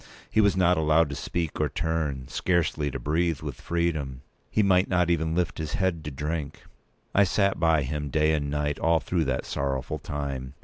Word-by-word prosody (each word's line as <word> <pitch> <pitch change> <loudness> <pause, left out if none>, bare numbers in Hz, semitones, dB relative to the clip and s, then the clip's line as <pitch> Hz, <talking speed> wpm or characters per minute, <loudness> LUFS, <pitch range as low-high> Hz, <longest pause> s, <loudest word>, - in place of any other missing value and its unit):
He 110 - +4
was 100 -2 +3
not 90 -1 +4
allowed 80 0 +3
to 70 - -4
speak 85 0 -3
or 75 - +1
turn—scarcely 80 +1 -1
to - - -4
breathe 80 0 0
with 75 -5 -6
freedom. 75 -6 -2 0.3
He 110 - +2
might 95 -1 +4
not 90 -2 +2
even 80 -1 0
lift 90 -2 -1
his 80 -1 -4
head 95 -4 0
to - - -2
drink. 75 +1 -4 0.5
I 100 - +6
sat 100 +1 +1
by 80 -3 +3
him 75 +2 -3
day 75 +2 +2
and 70 -2 -1
night 75 0 -1
all 80 0 +3
through 85 -1 -1
that 65 -2 -1
sorrowful 70 +2 -2
time. 70 -2 -5
80 Hz, 185 wpm, -26 LUFS, 70-85 Hz, 0.5 s, I